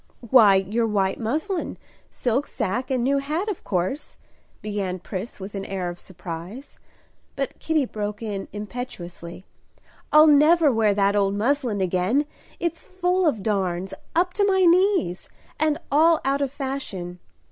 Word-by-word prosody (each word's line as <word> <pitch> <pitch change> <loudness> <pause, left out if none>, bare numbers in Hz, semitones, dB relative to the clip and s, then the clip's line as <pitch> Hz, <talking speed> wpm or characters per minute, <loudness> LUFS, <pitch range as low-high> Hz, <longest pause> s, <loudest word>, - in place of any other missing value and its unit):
"Why, 215 -6 +8
your 210 +5 +1
white 195 -3 0
muslin, 315 - -2 0.3
silk 255 +4 -1
sacque, 235 +4 -2
and 255 -3 0
new 275 +2 +2
hat, 310 +8 -2
of 400 - -5
course," 185 - -2 0.5
began 200 -3 -2
Pris 190 +5 -6
with 195 +1 -7
an 195 -1 -4
air 190 -2 -3
of 175 0 -8
surprise. 185 - -9 0.6
But 275 -1 -4
Kitty 315 -3 +1
broke 210 -1 -5
in 200 -3 -4
impetuously, 195 -5 -7 0.7
"I'll 305 +1 +8
never 305 +1 +5
wear 220 -3 +2
that 200 0 +2
old 200 -1 +2
muslin 240 -2 0
again; 185 +10 +1 0.3
it's 335 -1 -2
full 370 -1 0
of 220 -10 0
darns, 190 -3 -1 0.2
up 360 +2 +2
to 410 - +1
my 385 -1 +3
knees, 360 - +3 0.3
and 310 -1 +2
all 320 +3 +5
out 275 +1 +1
of 275 -2 0
fashion. 260 -11 -5
230 Hz, 145 wpm, -24 LUFS, 195-300 Hz, 0.7 s, Why